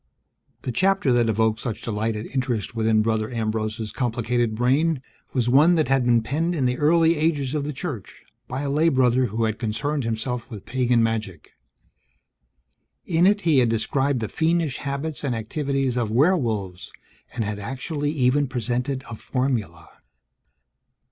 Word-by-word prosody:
The 125 - -2
chapter 185 0 +2
that 120 -2 +3
evoked 110 0 +1
such 115 -2 -5
delight 110 0 -1
and 105 +1 -5
interest 125 -6 -2
within 110 -1 +2
Brother 110 -1 0
Ambrose's 110 -1 -2
complicated 120 -2 -1
brain 135 +5 +1 0.3
was 125 -2 0
one 150 +8 +5
that 155 -4 +1
had 135 -2 +2
been 120 -2 +3
penned 160 +9 -1
in 135 -5 0
the 125 0 0
early 165 +2 +4
ages 150 -4 0
of 150 -2 -1
the 150 - -2
Church 135 - -7 0.2
by 135 - -4
a 145 - -2
lay 155 +4 +3
brother 130 -2 +3
who 110 +3 -2
had 110 -1 -1
concerned 125 +6 -2
himself 115 +2 -3
with 105 -5 -9
pagan 125 -2 +2
magic. 110 -7 -3 1.5
In 170 +1 +3
it, 205 +1 +3
he 160 -6 +3
had 120 -2 +3
described 130 +4 0
the 110 - -1
fiendish 160 -1 0
habits 140 +2 -4
and 130 -4 -1
activities 135 +3 -1
of 115 -3 0
werewolves 115 - 0 0.4
and 115 - -1
had 105 0 -4
actually 145 - -3
even 145 -1 +2
presented 125 +2 -2
a 115 - -6
formula. 115 -10 -2
125 Hz, 160 wpm, -24 LUFS, 110-145 Hz, 1.5 s, one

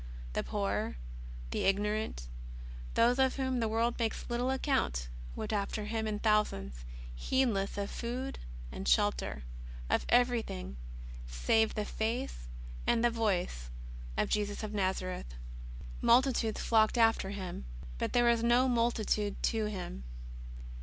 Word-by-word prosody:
The - - 0
poor, 205 - -1 0.5
the - - 0
ignorant, 205 - 0 0.7
those 245 +3 +4
of 265 -1 +4
whom 260 -2 0
the 225 - +1
world 230 +2 +1
makes 225 -1 -1
little 245 +2 +1
account, 260 - 0 0.3
w^ent - - -3
after 205 +1 -1
Him 220 0 -1
in 210 -1 -1
thousands, 65 - +1 0.3
heedless 200 - +1
of 200 0 -2
food 250 +3 -4 0.3
and 65 - -5
shel - - +5
ter, 60 +2 -5 0.5
of - - +1
everything 230 - +1 0.3
— - - -11 0.2
save 220 -1 +4
the 210 - -1
Face 225 - -2 0.4
and 235 0 +3
the 240 - +4
Voice 185 - -1 0.5
of - - +2
Jesus 205 0 -1
of 215 - -3
Xazareth. 185 - -2 0.7
Multitudes 240 -3 +3
flocked 220 +1 +4
after 225 -4 +4
Him. 185 - -5 0.3
But - - -1
there 240 0 +4
was 235 -1 +4
no 240 +2 +4
multitude 230 -4 +1
to 220 -2 +1
Him. 185 - -5
215 Hz, 135 wpm, -32 LUFS, 195-235 Hz, 0.7 s, shel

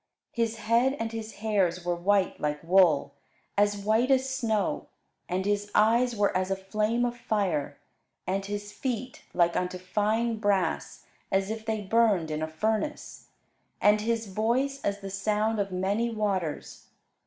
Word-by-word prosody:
His 230 -1 -1
head 230 +5 +2
and 225 0 -2
his 225 -1 -6
hairs 185 -5 +1
were 175 - +1
white 190 +3 +1
like 150 0 -2
wool, 165 -5 +4 0.4
as 205 0 +3
white 220 +5 +1
as 265 -1 +3
snow; 230 -6 -1 0.4
and 185 +1 -1
his 205 0 0
eyes 235 +3 +4
were 205 -2 +1
as 185 0 0
a 195 - +1
flame 215 +5 0
of 240 0 -2
fire; 195 -11 -1 0.5
and 195 +1 -1
his 205 +1 -5
feet 250 +2 -4
like 170 -1 +2
unto 180 0 -1
fine 215 +5 0
brass, 205 -3 -1 0.3
as 195 +2 +1
if 220 0 -6
they 220 -1 -1
burned 205 -6 +2
in 155 0 -2
a 155 - -1
furnace; 220 - -3 0.5
and 210 +1 +4
his 230 +1 -1
voice 240 +8 0
as 200 0 -1
the 195 -1 -6
sound 210 +2 0
of 200 -1 -1
many 200 +6 0
waters. 195 -8 -3
205 Hz, 155 wpm, -28 LUFS, 190-225 Hz, 0.5 s, wool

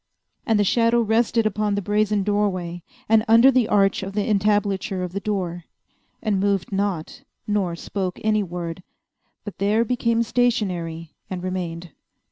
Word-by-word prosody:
And 225 -2 +3
the 205 - +3
shadow 230 +3 +3
rested 230 0 +2
upon 210 -1 0
the 205 - -1
brazen 210 0 +1
doorway, 185 -4 -1 0.3
and 220 0 +4
under 230 +4 +7
the 250 -4 +2
arch 195 -2 +2
of 195 +1 -6
the 205 0 0
entablature 200 -2 +1
of 180 - -4
the 200 - -2
door, 180 -5 -3 0.6
and 210 -3 +1
moved 200 -1 0
not, 195 -5 -2 0.2
nor 200 -5 -1
spoke 185 +1 -4
any 215 -1 +2
word, 175 -2 -5 0.6
but 205 - -9
there 210 +4 +2
became 235 -1 +1
stationary 185 -10 -1 0.2
and 180 -1 -5
remained. 175 -2 -4
205 Hz, 150 wpm, -23 LUFS, 185-215 Hz, 0.6 s, under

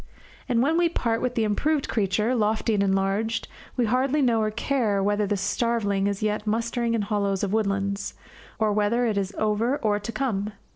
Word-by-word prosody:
And 240 -1 +3
when 315 +4 +2
we 345 -1 +3
part 230 -8 -1
with 250 -1 -1
the 225 - +2
improved 280 +8 0
creature, 210 +3 +1
lofty 220 -1 +1
and 205 - +2
enlarged, 195 +3 0 0.3
we 245 - +2
hardly 260 +6 +1
know 235 -5 +3
or 215 - +1
care 215 -3 0
whether 205 +1 +1
the 205 - 0
starveling 200 -1 0
is 200 0 -2
yet 210 0 -1
mustering 230 +1 0
in 220 - 0
hollows 200 -2 -1
of 200 0 -1
woodlands, 200 -2 -1 0.4
or 215 -1 +1
whether 215 +4 +2
it 220 -3 0
is 195 -1 -1
over 215 +5 +1
or 210 -5 0
to 210 +3 -5
come. 215 -4 -2
215 Hz, 190 wpm, -25 LUFS, 200-235 Hz, 0.4 s, And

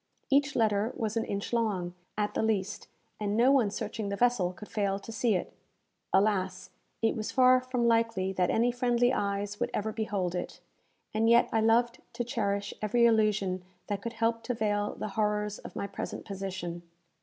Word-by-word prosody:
Each 280 +1 +3
letter 215 0 +2
was 220 -3 -2
an 225 - 0
inch 200 +3 -4
long, 200 -7 0 0.2
at 210 0 0
the - - 0
least, 210 -3 -1 0.3
and 210 0 -1
no 245 +3 +5
one 255 -7 +4
searching 210 +1 -4
the 200 - -1
vessel 230 -6 +2
could 185 +4 -11
fail 200 -2 0
to 205 - -9
see 220 -1 +1
it. 180 - -3 0.6
Alas! 190 -2 +1 0.3
it 225 - +3
was 215 -1 -3
far 255 -1 +5
from 255 -2 -1
likely 230 -5 +2
that 180 -1 +1
any 235 +2 +3
friendly 245 0 +2
eyes 200 -1 -2
would - - 0
ever 220 +1 -1
behold 205 -5 -2
it; 180 - -4 0.5
and 220 +1 +2
yet 235 +1 +5
I 225 - +3
loved 235 +2 +3
to 240 - -2
cherish 200 -4 -2
every 235 +3 +3
illusion 210 -5 +2 0.3
that 200 -1 -2
could 235 +2 -5
help 230 0 0
to 245 - -1
veil 205 -1 0
the 215 - -4
horrors 210 0 -1
of - - -10
my - - -2
present 200 - -6
position. 190 -3 -5
215 Hz, 185 wpm, -29 LUFS, 200-235 Hz, 0.6 s, no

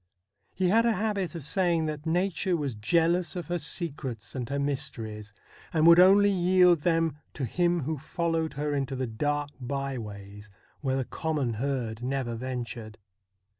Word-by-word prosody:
He 185 -1 +1
had 225 +4 +5
a 230 - +3
habit 200 -5 -1
of 165 - -6
saying 170 +1 +1
that 155 0 -4
nature 180 +1 +1
was 145 -5 -2
jealous 165 - +1
of 175 -3 -5
her 175 0 0
secrets 145 - -3
and 125 -2 -4
her 140 - -1
mysteries, 110 -7 -3 0.4
and 160 -1 +2
would 170 +1 +8
only 200 +2 +7
yield 180 -2 +4
them 165 -2 +1 0.2
to 135 - -2
him 175 +6 +1
who 150 +1 -3
followed 165 +1 -1
her 145 +1 -2
into 135 -1 -1
the 130 0 -1
dark 145 +5 -2
by 135 0 -3
ways 105 -1 -9 0.3
where 135 -3 -1
the 130 - -1
common 150 -7 -2
herd 120 -2 -2
never 130 -1 -2
ventured. 120 -2 -5
145 Hz, 165 wpm, -28 LUFS, 125-170 Hz, 0.4 s, would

